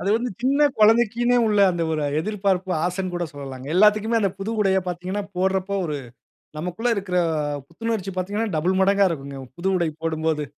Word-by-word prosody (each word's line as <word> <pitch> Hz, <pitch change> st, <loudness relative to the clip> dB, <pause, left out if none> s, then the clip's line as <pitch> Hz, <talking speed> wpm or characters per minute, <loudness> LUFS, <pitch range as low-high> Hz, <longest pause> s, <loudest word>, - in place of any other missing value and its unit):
அது -, -, -2 dB
வந்து 245 Hz, +1 st, -2 dB
சின்ன 280 Hz, +3 st, +4 dB
குழந்தைக்குன்னே 235 Hz, +2 st, +4 dB
உள்ள 210 Hz, -1 st, +2 dB
அந்த 170 Hz, -1 st, -2 dB
ஒரு 155 Hz, -1 st, -1 dB, 0.2 s
எதிர்பார்ப்பு, 195 Hz, -2 st, -1 dB
ஆசைன்னு 180 Hz, 0 st, -2 dB
கூட 175 Hz, 0 st, -1 dB
சொல்லலாங்க. 135 Hz, -2 st, -8 dB
எல்லாத்துக்குமே 215 Hz, +3 st, +4 dB
அந்த 195 Hz, -2 st, +1 dB
புது 195 Hz, +3 st, -3 dB
உடையை 190 Hz, -1 st, +3 dB
பார்த்தீங்கன்னா, 185 Hz, +3 st, -3 dB
போடுறப்போ 190 Hz, +1 st, 0 dB
ஒரு 150 Hz, -2 st, -3 dB, 0.6 s
நமக்குள்ள 180 Hz, +9 st, -2 dB
இருக்குற 185 Hz, -2 st, -1 dB, 0.5 s
புத்துணர்ச்சி 205 Hz, +2 st, -3 dB
பார்த்தீங்கன்னா 205 Hz, +4 st, -2 dB
டபிள் 185 Hz, +5 st, +1 dB
மடங்கா 200 Hz, +1 st, +4 dB
இருக்குங்க, 140 Hz, -3 st, -5 dB, 0.2 s
புது 185 Hz, +3 st, -2 dB
உடை 170 Hz, -2 st, +1 dB
போடும்போது. 160 Hz, -2 st, -1 dB
190 Hz, 160 wpm, -23 LUFS, 175-210 Hz, 0.6 s, சின்ன